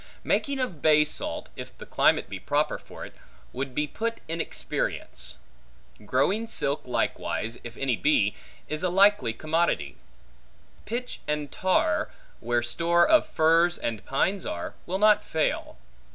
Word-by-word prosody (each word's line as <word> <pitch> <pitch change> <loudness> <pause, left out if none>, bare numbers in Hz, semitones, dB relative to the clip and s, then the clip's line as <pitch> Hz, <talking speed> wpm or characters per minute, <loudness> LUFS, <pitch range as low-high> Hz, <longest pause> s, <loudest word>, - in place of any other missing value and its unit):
Making 280 -2 +1
of 220 - -3
bay 150 -1 +5
salt, 150 - -2
if - - -9
the - - -10
climate - - +2
be - - -6
proper - - 0
for - - -10
it, - - -12 0.4
would 130 0 -4
be 150 - +1
put 230 +9 -3
in 165 +1 -2
experience. - - -3 0.7
Growing 200 - +1
silk 140 - 0
likewise, 115 -2 -2
if 120 -1 -9
any 135 -3 0
be, 110 -7 +2 0.3
is 155 +1 -2
a 180 - +1
likely 195 - +4
commodity. 155 - -1 0.9
Pitch 245 +3 -4
and 150 -1 -2
tar, 185 - +1 0.3
where 120 +1 0
store 170 +8 +3
of 315 -1 +5
firs 165 +2 +3
and 110 -3 -3
pines 180 +8 0
are, 85 - -4
will 185 - -1
not 210 +1 +5
fail. 160 -1 -1
155 Hz, 145 wpm, -26 LUFS, 125-190 Hz, 0.9 s, bay